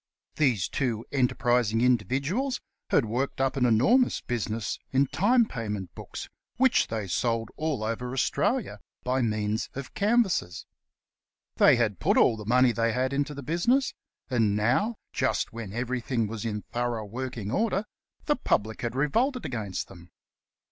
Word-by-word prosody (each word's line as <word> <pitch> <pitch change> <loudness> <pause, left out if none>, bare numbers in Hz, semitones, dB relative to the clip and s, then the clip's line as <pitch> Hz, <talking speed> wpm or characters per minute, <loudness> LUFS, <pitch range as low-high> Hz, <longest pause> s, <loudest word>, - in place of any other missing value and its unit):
These 125 - +2
two 120 -5 -2
enterprising 120 -4 +2
indi 125 -3 +4
viduals 185 - -1 0.3
had 135 - +3
worked 125 +6 -2
up 135 -1 +1
an 125 -2 +3
enormous 220 - +4
business 115 -2 -3
in 135 +1 +3
time 220 - +3
payment 105 - -5
books, - - -8 0.3
which 260 0 +4
they 110 -2 -3
sold 115 +4 -1
all 155 -8 -2
over 115 +3 -3
Australia 130 - 0 0.2
by 130 +1 +1
means 110 -1 -1
of 135 -1 -7
canvassers. 200 - +1 0.9
They - - +7
had 110 -6 0
put - - +2
all - - +5
the 105 -1 -9
money 125 +1 +5
they 115 -1 0
had 130 +2 0
into 145 +1 -1
the 140 - -7
business; 235 - +1 0.3
and 115 -6 +2
now, 130 - +1 0.2
just - - 0
when 115 -4 -6
everything 120 +1 -1
was 110 +1 -5
in 105 -2 -3
thorough 120 -2 -2
working 115 -1 -5
order, 215 - 0 0.4
the 295 - +2
public 110 - 0
had 120 0 -3
revolted 235 - +1
against 110 -6 -3
them. 85 -2 -14
125 Hz, 150 wpm, -27 LUFS, 110-140 Hz, 0.9 s, They